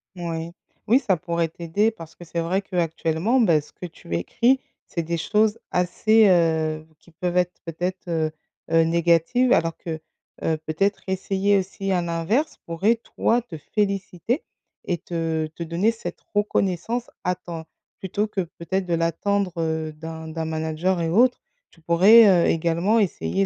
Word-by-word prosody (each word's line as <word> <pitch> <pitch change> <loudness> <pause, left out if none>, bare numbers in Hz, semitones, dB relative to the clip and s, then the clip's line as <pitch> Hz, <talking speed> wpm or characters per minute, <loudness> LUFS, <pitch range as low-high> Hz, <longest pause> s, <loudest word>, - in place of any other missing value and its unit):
Moui. 165 -1 -4 0.4
Oui, 245 +5 +5
ça 210 -9 +1
pourrait 170 0 -1
t'aider 170 +6 0
parce 165 -7 -12
que - - -12
c'est 170 +1 -3
vrai 180 +4 0
qu'actuellement, 175 +4 0
bah, 170 -10 +4
ce 145 - -18
que - - -9
tu 165 - -9
écris, 240 - +2 0.3
c'est 170 - -3
des 170 +1 -2
choses 210 +5 +2
assez, 215 +5 +3
heu, 160 -3 +2
qui 170 - -21
peuvent 175 +2 -2
être 180 0 +2
peut-être, 175 +3 -3
heu 160 -2 0 0.4
heu, 165 0 +5
négatives 170 +9 +3
alors 165 0 +1
que, 160 -2 -5 0.4
heu, 160 - +1
peut-être 195 +6 0
essayer 195 +1 +1
aussi 195 +1 -3
à 180 -2 +2
l'inverse, 170 - -1
pourrait 190 +8 +2 0.2
toi, 240 +1 +2
te 205 -9 -9
féliciter 200 - -2 0.4
et 175 - -1
te 160 -2 -2
te 160 +2 -7
donner 170 +7 +1
cette 230 - -7 0.2
reconnaissance 205 +3 0
à 180 - +1
temps 170 -3 -8 0.3
plutôt 200 +3 -1
que, 205 -2 -2
peut-être, 180 +2 -3
de 175 - -2
l'attendre, 180 +3 0
heu, 160 -1 -2
d'un 160 +1 -8
d'un 160 0 -4
manager 160 +3 -1
et 165 - 0
autre. 245 +8 +4 0.3
Tu 165 - -23
pourrais, 195 +8 +7 0.2
heu, - - +3
également 170 +7 +2
essayer 95 - 0
175 Hz, 160 wpm, -23 LUFS, 165-200 Hz, 0.4 s, pourrais